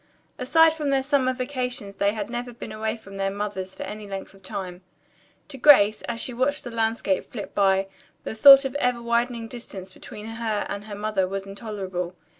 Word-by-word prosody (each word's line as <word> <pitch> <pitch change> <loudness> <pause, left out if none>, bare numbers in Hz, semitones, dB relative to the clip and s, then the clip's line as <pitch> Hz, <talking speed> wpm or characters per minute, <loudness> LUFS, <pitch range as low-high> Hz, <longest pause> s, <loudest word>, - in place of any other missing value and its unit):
Aside 320 +5 +5
from 305 -3 -3
their 270 -1 +2
summer 270 -2 +2
vacations 250 -6 -3
they 200 0 +2
had 215 - -3
never 240 +1 -5
been 225 - -8
away 220 +1 -3
from 195 -3 -12
their 195 0 0
mothers 195 -2 -4
for - - -6
any 210 -1 -7
length 195 -1 -7
of 195 - -18
time. 185 -1 -6 0.7
To 270 -2 -8
Grace, 215 -7 +6
as 235 -1 -3
she 250 - -4
watched 260 +4 0
the 240 - -7
landscape 225 -4 -1
flit 210 -5 -7
by, 195 -1 +3 0.4
the - - -4
thought 275 +4 +9
of 270 - -1
the 285 - -3
ever 250 -1 +1
widening 235 0 0
distance 195 -6 -9
between 210 +2 -10
her 225 -2 -2
and 200 +1 -5
her 210 -1 -7
mother 205 -2 0
was 195 +1 -4
intolerable. 195 -3 -5
220 Hz, 200 wpm, -25 LUFS, 195-250 Hz, 0.7 s, thought